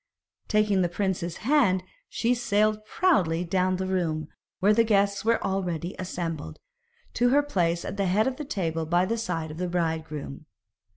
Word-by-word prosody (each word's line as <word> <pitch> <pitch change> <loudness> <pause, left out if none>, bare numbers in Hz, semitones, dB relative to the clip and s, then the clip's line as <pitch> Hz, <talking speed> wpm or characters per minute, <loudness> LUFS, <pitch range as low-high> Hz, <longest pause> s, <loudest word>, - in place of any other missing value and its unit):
Taking 210 -3 +2
the 175 - +1
prince's 175 -2 -2
hand, 240 -10 +3 0.3
she 240 +1 +1
sailed 215 -2 +1
proudly 185 - +2
down 185 +1 +1
the 190 +1 -2
room, 165 -5 -1 0.3
where 205 +3 +4
the 230 - +4
guests 200 -2 +2
were 230 +1 +2
already 180 -3 -2
assembled, 170 -4 -4 0.6
to 245 0 +3
her 285 +3 +4
place 175 -11 0
at - - -5
the 195 -1 +1
head 205 +4 +3
of 265 -1 -1
the 300 - -4
table 165 - -2
by 175 +2 +3
the 230 +4 -1
side 165 -7 -3
of 155 - -9
the 180 +1 -2
bridegroom. 160 -4 -3
185 Hz, 170 wpm, -26 LUFS, 170-215 Hz, 0.6 s, where